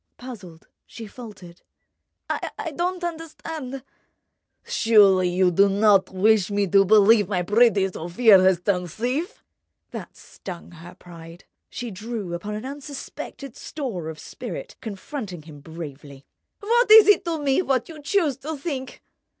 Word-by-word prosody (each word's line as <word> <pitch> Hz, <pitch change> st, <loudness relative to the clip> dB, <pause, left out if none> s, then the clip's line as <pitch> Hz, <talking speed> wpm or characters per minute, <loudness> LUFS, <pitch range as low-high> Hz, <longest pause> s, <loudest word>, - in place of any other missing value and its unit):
Puzzled, 200 Hz, -10 st, -11 dB, 0.2 s
she 230 Hz, -, -9 dB
faltered: 205 Hz, -6 st, -12 dB, 0.7 s
"I 325 Hz, -, -4 dB
don't 360 Hz, +2 st, -2 dB
understand—" 315 Hz, -5 st, -6 dB, 0.8 s
"Surely 195 Hz, -5 st, +4 dB
you 180 Hz, 0 st, +2 dB
don't 200 Hz, +2 st, +4 dB
wish 200 Hz, +1 st, +2 dB
me 205 Hz, 0 st, 0 dB
to 195 Hz, +1 st, +5 dB
believe 210 Hz, 0 st, +5 dB
my 180 Hz, -3 st, 0 dB
pretty 210 Hz, 0 st, +3 dB
Sofia 190 Hz, +4 st, +4 dB
has 185 Hz, -2 st, +3 dB
turned 180 Hz, -2 st, -1 dB
thief?" 260 Hz, -, -3 dB, 0.5 s
That -, -, -9 dB
stung 175 Hz, -2 st, -10 dB
her 175 Hz, +1 st, -13 dB
pride. 170 Hz, -1 st, -13 dB, 0.3 s
She 240 Hz, -2 st, -6 dB
drew 210 Hz, -2 st, -6 dB
upon 205 Hz, +5 st, -5 dB
an 215 Hz, +4 st, -6 dB
unsuspected 275 Hz, -1 st, -8 dB
store 220 Hz, -, -5 dB
of 160 Hz, -, -8 dB
spirit, -, -, -8 dB
confronting 205 Hz, -, -7 dB
him 150 Hz, -2 st, -13 dB
bravely. 145 Hz, -3 st, -10 dB, 0.4 s
"What 470 Hz, +3 st, +2 dB
is 435 Hz, -1 st, +9 dB
it 415 Hz, -, +5 dB
to 335 Hz, -1 st, -1 dB
me, 280 Hz, +2 st, +1 dB
what 265 Hz, -8 st, 0 dB
you 315 Hz, -2 st, -11 dB
choose 295 Hz, -3 st, 0 dB
to 305 Hz, +3 st, -6 dB
think?" 270 Hz, -4 st, -6 dB
215 Hz, 135 wpm, -23 LUFS, 180-275 Hz, 0.8 s, is